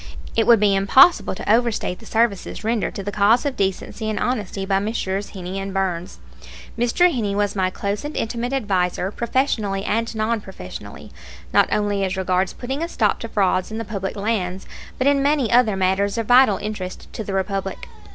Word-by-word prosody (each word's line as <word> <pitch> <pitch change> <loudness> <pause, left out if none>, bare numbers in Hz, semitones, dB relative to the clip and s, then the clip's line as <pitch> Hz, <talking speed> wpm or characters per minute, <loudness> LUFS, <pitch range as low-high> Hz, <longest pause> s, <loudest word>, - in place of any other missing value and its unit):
It 225 -1 +2
would 235 -2 +7
be 205 -1 +3
impossible 205 - +5
to - - -8
overstate 230 -6 0
the 225 - -13
services 225 -2 0
rendered 225 0 -1
to 195 - -4
the 205 - -3
cause 210 +6 +3
of 280 -2 -1
decency 200 +3 -2
and 215 - -2
honesty 205 -5 -2
by 195 0 +1
Messrs. 200 -2 -3
Heney 190 0 -5
and 195 0 -4
Burns. 185 -1 -2 0.6
Mr. 240 +10 +3
Heney 210 -6 -1
was 205 0 0
my 185 -1 +1
close 200 +2 -3
and 295 +1 -5
intimate 235 +2 -2
adviser 190 -7 0
professionally 220 -5 -1
and 230 +1 -1
non 220 +1 0
professionally, 190 -2 -10 0.4
not - - +4
only 205 -1 0
as 190 0 -2
regards 185 0 0
putting 265 +4 -5
a 335 - -1
stop 215 -10 +1
to 230 - -5
frauds 185 -3 +1
in 220 - -5
the 230 - -4
public 195 -2 -4
lands, 200 -3 -2 0.3
but 260 - 0
in 280 0 +4
many 280 -4 +1
other 235 -4 +4
matters 190 +2 +1
of 230 - -1
vital 245 -4 +5
interest 200 -3 -6
to 220 - -4
the 200 - -5
Republic. 195 0 -3
205 Hz, 190 wpm, -21 LUFS, 195-230 Hz, 0.6 s, would